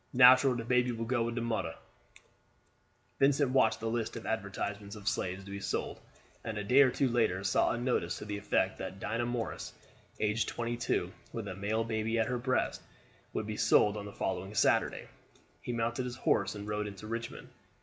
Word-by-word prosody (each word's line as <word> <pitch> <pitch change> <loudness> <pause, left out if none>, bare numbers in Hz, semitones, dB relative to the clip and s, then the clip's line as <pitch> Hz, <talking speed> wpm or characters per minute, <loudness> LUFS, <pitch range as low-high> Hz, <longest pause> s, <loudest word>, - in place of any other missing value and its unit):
Natural 130 +1 +7
the 120 - -3
baby 125 +1 +2
will 115 -1 -3
go 120 +1 +1
wid 115 0 -1
de 120 - -1
modder." 110 -8 -2 1.4
Vincent 140 -1 +4
watched 110 -4 +3
the 115 - -3
list 115 -1 -2
of 115 - -7
advertisements 100 +1 -3
of 105 -1 -10
slaves 95 -4 -1
to 100 - -9
be 100 - -4
sold, 100 - -3 0.4
and 110 -2 -4
a 105 - -2
day 125 +8 +6
or 135 - +6
two 135 +2 +1
later 110 -6 +1
saw 95 - +3
a - - 0
notice 120 -8 0
to - - -7
the 105 -1 -4
effect 100 -2 0
that 95 0 -6
Dinah 115 +4 -1
Morris, 120 -2 -3 0.5
age 105 +1 +1
twenty 120 0 -2
two, 120 - -1 0.2
with - - -5
a - - -4
male 105 +4 0
baby 110 0 -1
at 110 - +3
her 125 -1 -1
breast, 130 +1 0 0.5
would 110 - -2
be 105 0 -4
sold 105 0 +4
on 105 -1 -5
the 100 - -7
following 95 +1 -3
Saturday. - - +2 0.5
He - - -4
mounted 120 +2 -1
his 125 -1 -4
horse - - +1
and 100 0 -7
rode 105 0 -2
into 100 +1 -9
Richmond. 115 +1 -5
115 Hz, 200 wpm, -32 LUFS, 105-120 Hz, 1.4 s, Natural